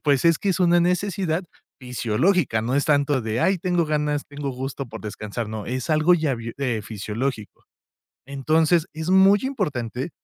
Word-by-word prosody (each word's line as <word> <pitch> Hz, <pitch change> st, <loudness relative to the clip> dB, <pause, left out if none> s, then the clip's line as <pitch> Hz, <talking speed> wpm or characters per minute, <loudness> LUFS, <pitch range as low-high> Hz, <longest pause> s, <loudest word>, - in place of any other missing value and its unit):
pues 145 Hz, 0 st, +2 dB
es 165 Hz, -2 st, +4 dB
que 200 Hz, -, -1 dB
es 190 Hz, -, -1 dB
una 175 Hz, -1 st, +4 dB
necesidad 180 Hz, -1 st, 0 dB, 0.4 s
fisiológica. 125 Hz, -, +1 dB
No 125 Hz, +3 st, -1 dB
es 145 Hz, -, +2 dB
tanto 145 Hz, -2 st, +2 dB
de: 110 Hz, +2 st, -2 dB
"Ay, 190 Hz, -1 st, +2 dB
tengo 175 Hz, -2 st, +1 dB
ganas. 150 Hz, -1 st, -1 dB
Tengo 145 Hz, -1 st, -5 dB
gusto 135 Hz, +1 st, -5 dB
por 110 Hz, 0 st, -8 dB
descansar". 105 Hz, +1 st, -5 dB
No, 110 Hz, -1 st, -5 dB
es 130 Hz, +4 st, -3 dB
algo 155 Hz, +3 st, +4 dB
ya, 155 Hz, -6 st, 0 dB, 0.2 s
eh, 120 Hz, -6 st, -1 dB
fisiológico. 110 Hz, +3 st, -5 dB, 0.6 s
Entonces 155 Hz, +4 st, +2 dB
es 160 Hz, +3 st, -4 dB
muy 190 Hz, +2 st, +6 dB
importante 145 Hz, -, -3 dB
145 Hz, 165 wpm, -23 LUFS, 125-175 Hz, 0.6 s, muy